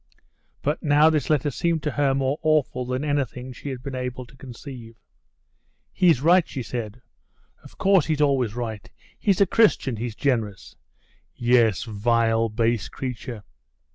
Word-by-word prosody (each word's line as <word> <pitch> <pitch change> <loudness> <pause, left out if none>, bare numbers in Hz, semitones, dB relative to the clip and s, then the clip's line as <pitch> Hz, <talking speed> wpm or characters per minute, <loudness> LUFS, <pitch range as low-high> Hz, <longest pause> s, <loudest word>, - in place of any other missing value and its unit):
But 150 +2 -1
now 150 +1 +5
this 150 -4 -1
letter 145 -1 +1
seemed 165 +4 -1
to 150 - -1
her 140 -1 +1
more 135 +2 -1
awful 150 -5 +1
than 130 +2 -2
anything 130 -3 -2
she 140 - -8
had 130 -2 -6
been 140 - -6
able 125 0 -4
to 130 - -19
conceive. 125 -2 -10 1.0
"He's 170 -8 +3
right!" 175 +1 +5
she 130 - -5
said; 115 -1 -6 0.6
"of - - -16
course, 190 -5 +3
he's 155 -2 0
always 135 -7 +1
right; 115 -2 -5 0.3
he's 200 -2 +1
a - - +7
Christian, 180 - +2
he's 115 0 -4
generous! 110 -9 -2 0.6
Yes, 120 -6 +3
vile, 115 +1 +1
base 115 0 0
creature! 125 -4 -6
130 Hz, 150 wpm, -24 LUFS, 115-145 Hz, 1.0 s, a